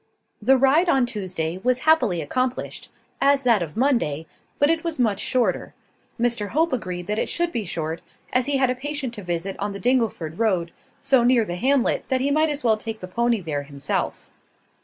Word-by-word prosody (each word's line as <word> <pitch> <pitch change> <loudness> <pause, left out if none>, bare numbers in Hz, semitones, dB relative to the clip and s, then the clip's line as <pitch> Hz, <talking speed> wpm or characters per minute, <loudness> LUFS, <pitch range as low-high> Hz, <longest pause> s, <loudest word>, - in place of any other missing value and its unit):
The 260 +5 +5
ride 285 +7 +4
on 265 -5 +4
Tuesday 185 -6 -4
was 255 +1 +2
happily 245 - +3
accomplished, 255 - -2 0.3
as 280 0 +4
that 235 -5 +4
of 170 +4 -5
Monday: 230 - +1 0.3
but 290 +2 +4
it 330 0 -1
was 335 -2 -2
much 220 -6 +1
shorter. 235 -7 0 0.4
Mr 235 -3 0
Hope 320 +6 +1
agreed 180 -7 -3
that 210 +3 -1
it - - -1
should 345 0 0
be 220 - -3
short, 165 -1 -4 0.3
as 255 0 +2
he 285 -1 +1
had 260 -2 +2
a - - -2
patient 275 -1 -4
to 210 - -7
visit 175 +2 -3
on 205 0 -2
the 200 - -6
Dingleford 225 -10 0
road, 185 -7 +1 0.3
so 265 -3 +3
near 240 -2 +4
the 175 - -4
hamlet 260 +8 +1
that 260 -1 +2
he 275 +2 0
might 310 +2 +3
as 295 0 -3
well 225 -3 +3
take 220 0 -6
the 185 - -7
pony 235 +3 0
there 150 -4 -3
himself. 140 -1 -4
235 Hz, 200 wpm, -23 LUFS, 185-270 Hz, 0.4 s, The